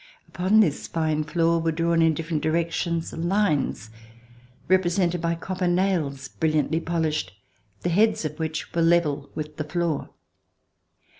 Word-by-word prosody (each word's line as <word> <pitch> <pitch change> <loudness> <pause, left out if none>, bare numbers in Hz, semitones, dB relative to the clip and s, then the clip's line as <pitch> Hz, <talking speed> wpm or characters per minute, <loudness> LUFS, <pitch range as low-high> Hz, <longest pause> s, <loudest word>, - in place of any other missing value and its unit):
Upon 190 +5 +3
this 155 -9 0
fine 155 -2 0
floor 165 +1 +1
were 165 0 0
drawn 165 +1 +1
in 160 -1 +4
different 160 -1 -2
directions 165 +1 -1
lines 165 - 0 0.8
represented 175 -1 +2
by 170 0 0
copper 185 +2 -3
nails, 175 -7 0
brilliantly 155 +1 0
polished, 160 - -1 0.5
the 175 - -1
heads 210 0 +2
of 150 +1 -5
which 160 0 -4
were 170 - +1
level 160 -4 +2
with 150 0 -6
the 155 - -2
floor. 165 -1 -2
165 Hz, 135 wpm, -25 LUFS, 155-175 Hz, 0.8 s, in